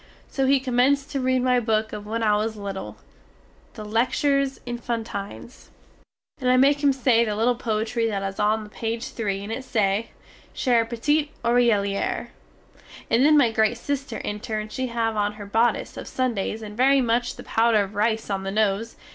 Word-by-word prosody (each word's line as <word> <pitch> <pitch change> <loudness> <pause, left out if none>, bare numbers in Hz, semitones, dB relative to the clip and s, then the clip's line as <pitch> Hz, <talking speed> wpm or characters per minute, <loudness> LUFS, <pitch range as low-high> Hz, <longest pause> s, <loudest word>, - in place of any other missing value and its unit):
So 270 -1 0
he 275 0 +4
commence 265 +2 +2
to 275 - -4
read 255 -1 +1
my 250 -1 +3
book 220 -2 0
of 210 0 -7
when 225 +1 -2
I 210 -1 +3
was 220 +1 -1
little, 200 -1 -6 0.8
the 215 -2 -7
"Lectures 270 +5 +1
Enfantines" 230 - -6 0.7
and 255 -2 0
I 255 - +5
make 280 +2 +4
him 285 -1 +4
say 250 -3 +3
the 215 -2 -2
little 230 +4 +2
poetry 230 0 -1
that 200 -3 -2
is 195 0 -4
on 215 +1 +2
the 210 - -11
page 230 +1 -4
3 200 -3 -3
and 205 - -6
it 260 +3 -4
say: 210 -3 0 0.5
"Cher 240 -4 +2
petit 295 +6 0
oreiller," 230 -5 +1 0.8
and 235 +3 +4
then 300 +1 +6
my 245 -6 +4
great 220 +1 +2
sister 280 +2 -3
enter 215 +2 -3
and 215 0 -6
she 260 0 -2
have 230 -2 -1
on 205 0 0
her 210 -1 -9
bodice 225 +4 0
of - - -7
Sundays 225 -3 -2
and 210 -1 -8
very 270 +3 +4
much 240 -1 0
the - - -10
powder 225 -2 +3
of 195 +1 -8
rice 220 0 0
on 195 -1 -1
the 195 - -4
nose. 215 +2 0
230 Hz, 185 wpm, -24 LUFS, 210-255 Hz, 0.8 s, then